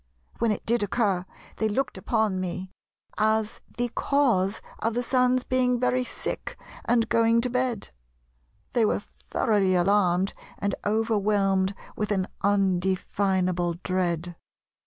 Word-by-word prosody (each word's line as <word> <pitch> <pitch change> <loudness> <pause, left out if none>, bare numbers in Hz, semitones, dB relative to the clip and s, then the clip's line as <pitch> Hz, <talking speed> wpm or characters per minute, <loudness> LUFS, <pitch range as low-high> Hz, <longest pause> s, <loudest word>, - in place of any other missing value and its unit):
When 230 -1 +2
it 210 - -3
did 235 0 +2
occur 200 -3 0 0.3
they 220 - +1
looked 255 +5 -1
upon 210 0 0
me 185 +1 -4 0.5
as 220 0 +1 0.2
the 245 0 0
cause 235 -7 +1 0.2
of 225 0 -1
the 245 - 0
Sun's 250 0 +2
being 250 -1 +1
'very 250 0 +2
sick - - -4 0.3
and 235 -1 +2
going 230 0 +3
to 250 0 -2
bed.' 250 -3 -1 0.8
They 235 - +3
were 210 - +1 0.3
thoroughly 195 -4 +2
alarmed, 185 0 +2 0.2
and 200 -1 -1
overwhelmed 205 -3 +1 0.2
with 210 -1 -2
an 190 -2 0
undefinable 190 -2 +1
dread." 175 -2 -1
205 Hz, 125 wpm, -26 LUFS, 190-235 Hz, 0.8 s, going